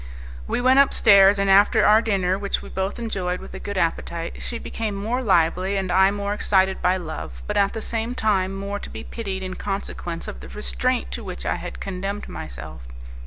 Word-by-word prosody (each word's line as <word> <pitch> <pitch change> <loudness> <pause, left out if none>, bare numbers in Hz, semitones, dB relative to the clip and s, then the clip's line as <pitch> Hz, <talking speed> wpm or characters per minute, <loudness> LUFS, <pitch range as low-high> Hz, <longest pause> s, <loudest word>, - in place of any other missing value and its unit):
We - - -1
went 260 +2 +5
upstairs, 200 -7 +6
and 200 0 +1
after 195 +1 +5
our 215 +1 +6
dinner 190 -5 +1
which 200 0 -2
we - - -10
both 190 +1 -3
enjoyed 190 -6 -2
with - - -11
a 190 - -6
good 200 -1 -5
appetite, 170 -1 -2
she 235 - -3
became 220 -2 -4
more 225 +6 -2
lively 185 -1 +2
and 190 -2 -2
I 190 +2 +5
more 200 0 -2
excited 190 -2 +2
by 180 +1 +3
love, 155 - -7
but - - -3
at 200 0 +2
the 225 - -4
same 230 +2 -2
time 195 -4 +1
more 200 +1 -4
to - - -8
be - - -8
pitied 195 -5 -5
in 185 0 -4
consequence 175 -4 -4
of 60 - -7
the 65 +1 -10
restraint - - -1
to 60 - -4
which - - -7
I - - 0
had - - -7
condemned 195 +2 -4
myself. 65 +2 -8
195 Hz, 205 wpm, -23 LUFS, 180-205 Hz, -, upstairs